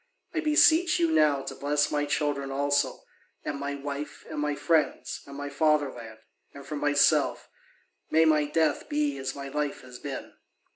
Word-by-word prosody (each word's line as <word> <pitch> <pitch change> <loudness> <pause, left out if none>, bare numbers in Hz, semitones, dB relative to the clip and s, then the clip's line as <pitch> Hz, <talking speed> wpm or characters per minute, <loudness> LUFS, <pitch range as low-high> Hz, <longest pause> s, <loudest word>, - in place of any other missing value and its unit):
I 330 - 0
beseech 320 +3 +4
you 335 -2 +2
now 145 - +3
to - - -6
bless 145 +1 0
my 145 0 0
children 145 -2 -1
also, 140 0 0 0.4
and 140 - -3
my 140 0 -3
wife, 140 +1 -6
and 155 - -4
my 150 0 0
friends, 160 0 0
and 140 0 -9
my 145 0 -4
fatherland; 140 -6 0 0.4
and 140 -1 -10
for 150 +2 -5
myself, 145 0 +2 0.6
may 160 +1 +4
my 155 -1 +4
death 150 -1 0
be 145 -1 0
as 135 0 -4
my 140 -1 -6
life 145 +1 -3
has 125 -1 -11
been." 140 -2 -7
145 Hz, 165 wpm, -27 LUFS, 140-150 Hz, 0.6 s, beseech